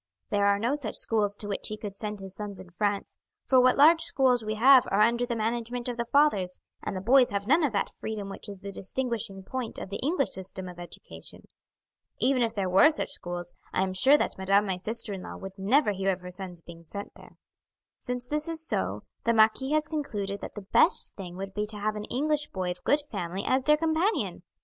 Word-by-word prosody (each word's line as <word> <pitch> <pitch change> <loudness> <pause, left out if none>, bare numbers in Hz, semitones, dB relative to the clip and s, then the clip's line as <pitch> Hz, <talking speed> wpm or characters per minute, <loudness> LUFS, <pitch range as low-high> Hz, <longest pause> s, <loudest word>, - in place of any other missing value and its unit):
There 200 0 +3
are 200 0 +4
no 235 +6 0
such 285 -7 -3
schools 205 -2 0
to 205 - -4
which 200 - -2
he 215 - -4
could 205 -2 -7
send 210 0 -4
his 190 -1 -8
sons 205 -2 -6
in 185 -2 -12
France, 205 +3 -2 0.3
for 260 - +5
what 255 0 +4
large 320 +4 +7
schools 250 -3 +3
we 215 0 -2
have 255 +3 +7
are 200 +2 +2
under 235 +2 +3
the 240 - -1
management 235 +2 -2
of 245 - -2
the 235 - -1
fathers, 205 -12 +3 0.2
and - - -4
the 185 - -3
boys 250 +5 +5
have 200 0 -2
none 310 +8 +4
of 290 - +2
that 200 - -1
freedom 215 -2 -4
which 195 +2 -7
is 200 -2 -8
the 200 - -6
distinguishing 200 -2 -3
point 250 +3 -5
of 190 - -7
the 200 - -4
English 285 0 0
system 190 0 -6
of 180 -1 -10
education. 175 - -9 0.7
Even 260 0 +2
if 230 -1 0
there 195 -2 0
were 190 +11 +6
such 310 - -2
schools, 175 -1 -5 0.2
I - - +2
am 190 -1 -2
sure 265 +10 +6
that - - -2
madame 195 +2 +3
my 190 -2 -1
sister 215 +2 -3
in 190 - -6
law - - -8
would 195 0 -9
never 215 +5 +3
hear 195 0 0
of 185 -1 -4
her 180 0 -8
sons 180 -2 -5
being 170 0 -12
sent 200 +5 -8
there. - - -16 0.6
"Since 250 -1 -4
this 300 +4 -1
is 325 -1 -3
so, - - -2 0.2
the 230 0 +2
marquis 220 +6 +3
has 305 0 +2
concluded 205 -11 -3
that - - -7
the 210 - -6
best 195 - +3
thing 180 -3 -8
would 195 0 -6
be 210 +1 -2
to 210 0 -1
have 215 +1 -1
an 210 0 -4
English 295 +4 0
boy 185 -2 -3
of 180 0 -8
good 295 +1 +3
family 190 -2 -3
as 260 0 +1
their 300 0 +5
companion. 325 +6 0
210 Hz, 230 wpm, -28 LUFS, 195-255 Hz, 0.7 s, large